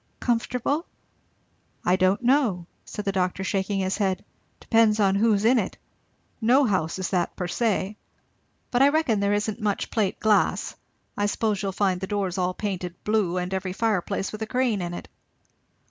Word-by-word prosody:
"Comfortable?" 250 +6 -1 1.0
"I 180 - +4
don't 185 +4 +2
know," 240 -9 +2 0.2
said 210 - -6
the 195 - +1
doctor 185 0 -1
shaking 195 +1 -1
his 190 0 -1
head; 190 -3 -1 0.3
"depends 225 -2 +3
on 195 -2 +4
who's 210 0 +2
in 245 +2 +5
it. 195 - -3 0.6
No 255 +5 +5
house 185 -7 0
is 185 -2 -3
that 180 -3 0
per 180 - -3
se. 210 +1 -1 0.7
But 245 - +2
I 275 - +7
reckon 285 -8 +1
there 200 0 +1
isn't 210 +2 -1
much 205 -2 -1
plate 210 -4 0
glass. 215 -1 +2 0.4
I 205 - +1
suppose 210 -1 0
you'll 195 -1 -1
find 190 -2 0
the 190 - -3
doors 195 -3 -2
all 180 0 0
painted 185 -4 -4
blue, 210 -5 +1
and 180 +1 -2
every 190 -1 -2
fireplace 200 -2 -1
with 215 - -8
a 220 - -2
crane 250 -5 0
in 175 0 -4
it." - - -8
200 Hz, 175 wpm, -25 LUFS, 185-225 Hz, 1.0 s, I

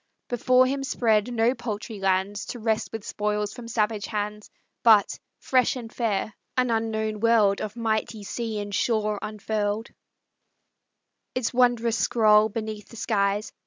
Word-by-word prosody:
Before 255 +1 +4
him 270 +1 -1
spread 225 -3 +1
no 235 +1 +2
paltry 220 -3 -5
lands, 195 +1 0
To - - -5
wrest 220 -1 -1
with 225 -2 -6
spoils 210 0 -2
from 245 -2 -9
savage 215 -2 0
hands; 210 0 -4 0.3
But, 220 -3 +5 0.2
fresh 255 -1 +2
and 235 -3 -8
fair, 215 -3 -1 0.2
an 250 -1 +2
unknown 220 -1 -1
world 215 -3 +3
Of 215 0 -5
mighty 220 -2 -2
sea 220 +1 -4
and 205 -1 -5
shore 215 -1 0
unfurled 215 +1 -2 1.5
Its 255 -1 -1
wondrous 240 -2 +2
scroll 215 -2 +4
beneath 215 -1 -5
the - - -12
skies. 205 -1 0
220 Hz, 140 wpm, -25 LUFS, 210-235 Hz, 1.5 s, But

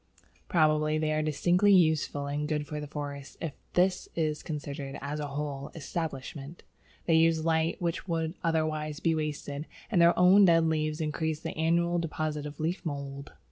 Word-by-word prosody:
Probably 155 -2 +3
they 155 0 0
are 155 0 +1
distinctly 175 +6 +3
useful 155 -4 +2
and 145 +1 -2
good 150 -1 -1
for 150 +1 -5
the 150 - -6
forest 140 -2 -6
if 165 -4 -4 0.2
this 180 +1 +2
is 155 -2 -1
considered 145 -2 -5
as 145 +2 -4
a 145 - -3
whole 140 0 -4
establishment. 150 -1 -5 0.4
They 165 - +2
use 160 0 +4
light 160 0 +1
which 170 +1 -2
would 165 -2 -1
otherwise 155 -2 -1
be 165 -2 +2
wasted, 150 -1 -3 0.2
and 180 -6 +4
their 170 0 +5
own 185 +3 +7
dead 165 -2 +5
leaves 155 0 0
increase 155 0 -2
the - - -5
annual 170 +2 +2
deposit 155 -2 -3
of 145 -1 -10
leaf 165 +4 -2
mould. 140 -3 -5
155 Hz, 170 wpm, -29 LUFS, 150-165 Hz, 0.4 s, own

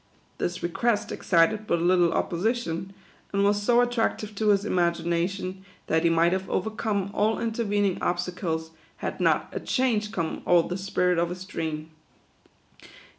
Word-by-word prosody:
This 175 +1 -2
request 210 +6 0
excited 205 +5 +2
but 170 - +1
little 175 0 +3
opposition, 190 -1 -1 0.4
and 200 0 +1
was 205 +1 +2
so 240 +3 +4
aitrac 240 -2 0
tive 215 0 -7
to 215 +1 -1
his 200 0 +3
imagination, 175 +1 -1 0.2
that 160 0 +1
he 170 - +4
might 165 +1 +3
have 190 0 -2
overcome 205 -1 -1
all 215 +2 +1
intervening 205 -4 0
obstacles, 175 -2 -2 0.3
had - - -4
not - - +2
" - - -26
a - - -1
change 225 -5 0
come 165 -6 -3
o'er 175 -1 +5
the 180 - -3
spirit 180 -2 +1
of 170 0 +1
his 180 +1 -6
dream." 160 -4 -4
185 Hz, 155 wpm, -26 LUFS, 170-210 Hz, 0.4 s, o'er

